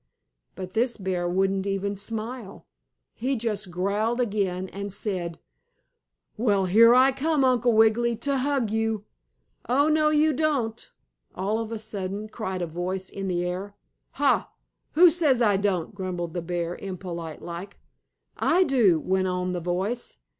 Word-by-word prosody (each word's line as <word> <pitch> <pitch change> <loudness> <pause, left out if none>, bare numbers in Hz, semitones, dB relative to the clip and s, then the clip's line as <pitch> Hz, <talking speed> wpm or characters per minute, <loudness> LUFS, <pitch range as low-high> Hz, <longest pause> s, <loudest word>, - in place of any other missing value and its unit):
But 185 0 -7
this 235 +2 +1
bear 185 -3 -2
wouldn't 195 +2 +1
even 200 +1 -1
smile. 220 +1 -5 0.5
He 260 +4 -1
just 215 -5 -2
growled 205 +7 -1
again 195 -5 -1
and 200 0 -6
said: 180 -5 -3 1.0
"Well, 205 -4 +2
here 230 +6 +7
I 260 +2 +6
come, 285 +1 +1
Uncle 245 -2 +3
Wiggily, 225 +2 +4
to 275 +5 -1
hug 265 -5 0
you!" 220 -1 -1 0.6
"Oh, 285 +5 +3
no 305 0 +3
you 305 0 +3
don't!" 260 -7 -1 0.4
all 205 +4 -1
of 225 0 -4
a 225 - -3
sudden 210 -1 -4
cried 190 -5 -4
a - - 0
voice 180 +3 -4
in 195 -1 -4
the 175 -1 -1
air. 190 +3 -4 0.4
"Ha! 285 0 +2 0.4
Who 345 +2 +7
says 300 -7 +2
I 210 -4 +4
don't?" 190 -2 0
grumbled 180 -4 -4
the 175 - -2
bear, 175 0 -3
impolite 175 -4 -6
like. 175 +4 -7 0.6
"I 360 +3 +3
do," 235 - +3
went 185 +3 0
on 180 0 -1
the 175 - -3
voice. 185 - -2
205 Hz, 150 wpm, -26 LUFS, 185-240 Hz, 1.0 s, here